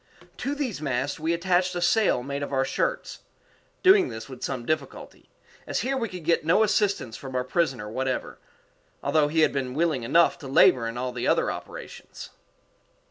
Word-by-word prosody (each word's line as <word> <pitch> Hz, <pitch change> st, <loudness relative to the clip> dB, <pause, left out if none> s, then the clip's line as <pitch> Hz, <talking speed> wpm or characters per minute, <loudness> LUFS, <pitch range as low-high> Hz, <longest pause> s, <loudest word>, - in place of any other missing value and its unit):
To 275 Hz, +3 st, -3 dB
these 255 Hz, -, -3 dB
masts 135 Hz, +1 st, -2 dB
we 160 Hz, +2 st, -1 dB
attached 180 Hz, +1 st, +1 dB
a -, -, -1 dB
sail 175 Hz, -, +2 dB
made 140 Hz, +2 st, -4 dB
of 145 Hz, -, -4 dB
our 135 Hz, -1 st, +1 dB
shirts -, -, -2 dB, 0.6 s
doing 380 Hz, +1 st, +6 dB
this 110 Hz, 0 st, -7 dB
with 130 Hz, -2 st, -11 dB
some 125 Hz, -3 st, -3 dB
difficulty, 155 Hz, +4 st, -4 dB, 0.4 s
as -, -, -1 dB
here 270 Hz, +2 st, -1 dB
we 235 Hz, -4 st, -2 dB
could 180 Hz, -4 st, -9 dB
get 165 Hz, -1 st, +2 dB
no 165 Hz, +7 st, +4 dB
assistance 200 Hz, -, 0 dB
from 135 Hz, -2 st, -8 dB
our 125 Hz, -, +1 dB
prisoner 130 Hz, -6 st, -1 dB
whatever, 130 Hz, +4 st, -3 dB, 0.6 s
although 155 Hz, -2 st, +2 dB
he 160 Hz, +2 st, +1 dB
had -, -, +3 dB
been 130 Hz, -2 st, -3 dB
willing 160 Hz, -4 st, +1 dB
enough 165 Hz, +9 st, +3 dB
to 140 Hz, -, -9 dB
labor 130 Hz, -3 st, +4 dB
in 115 Hz, +1 st, -5 dB
all 125 Hz, +1 st, -2 dB
the 125 Hz, -1 st, -3 dB
other -, -, +2 dB
operations. -, -, -9 dB
150 Hz, 185 wpm, -26 LUFS, 130-180 Hz, 0.6 s, doing